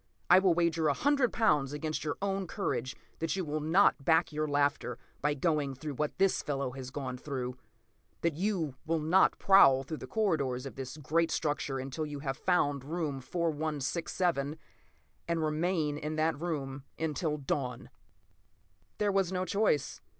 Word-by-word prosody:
I 180 - +9
will 185 -3 +3
wager 170 -2 +2
a 145 - +2
hundred 280 -3 +2
pounds 145 -11 +2
against 155 +1 -3
your 150 -2 -2
own 195 -1 -1
courage 130 - -2 0.2
that 165 +2 -1
you 190 -2 -2
will 155 0 -2
not 160 -1 +3
back 160 +2 +3
your 155 +1 -1
laughter 145 -4 0 0.2
by 145 0 +1
going 145 -2 0
through 145 +3 -5
what 150 +3 -2
this 195 0 +3
fellow 140 -3 -2
has 130 0 -7
gone 130 -2 -5
through. 125 -3 -4 0.7
That 170 -1 +1
you 175 -4 -1
will 165 +1 +2
not 160 +5 +3
prowl 135 -9 +6
through 155 +3 -5
the - - -8
corridors 140 - 0
of 135 - -6
this 135 +1 -7
great 160 +3 +1
structure 145 -3 -1
until 135 +4 -4
you 145 -1 -6
have 135 -2 -2
found 145 -5 +1
room 150 -2 -3
4167—and 160 +1 -3
remain 155 -1 0
in 155 +1 -3
that 155 -1 0
room 140 -5 -3
until 155 0 -1
dawn!" 135 -2 -3 1.1
There 205 -1 +1
was 195 -2 +1
no 185 0 -1
choice. 180 -7 0
155 Hz, 160 wpm, -31 LUFS, 140-170 Hz, 1.1 s, I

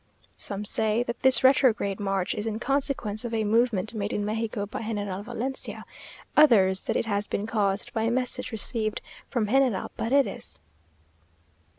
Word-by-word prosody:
Some 205 +1 +1
say 220 +2 +2
that 235 0 -5
this 265 0 +4
retrograde 245 -7 +3
march 195 -2 -1
is 210 +1 -4
in 215 -1 -2
consequence 255 -4 -1
of 235 -1 -3
a 220 - +1
movement 220 -1 +1
made 205 -2 -3
in 205 - -1
Mexico 215 -1 -2
by 210 - -6
General 205 -3 -3
Valencia 260 +5 -5 0.5
others 195 -11 +5
that - - -1
it - - -1
has 205 -2 -1
been 200 - -2
caused 205 -3 -1
by 225 - -1
a 225 - +1
message 255 +1 -1
received 220 0 -1 0.3
from 235 -4 0
General 255 -3 +2
Paredes. 255 - 0
220 Hz, 160 wpm, -26 LUFS, 205-245 Hz, 0.5 s, others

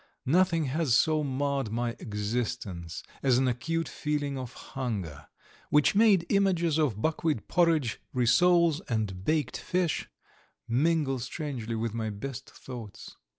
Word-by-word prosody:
Nothing 165 +2 +3
has 140 -2 +1
so 155 +2 +3
marred 140 -2 -1
my 120 +1 -1
existence 105 -5 -3 0.2
as 130 -3 +3
an 130 0 +2
acute 165 +7 -1
feeling 145 -2 -2
of 130 -2 -5
hunger, 100 - -5 0.4
which 150 -1 +4
made 205 -4 +5
images 175 -6 +2
of 130 -10 +1
buckwheat 155 -3 -1
porridge, 160 -9 +2
rissoles, 170 +6 +4
and 105 -6 -2
baked 150 0 0
fish 180 -6 -1 0.6
mingle 140 +1 +1
strangely 125 -3 -4
with 115 0 -2
my 110 -1 -2
best 115 +5 -6
thoughts. 120 -6 -10
135 Hz, 125 wpm, -29 LUFS, 115-160 Hz, 0.6 s, made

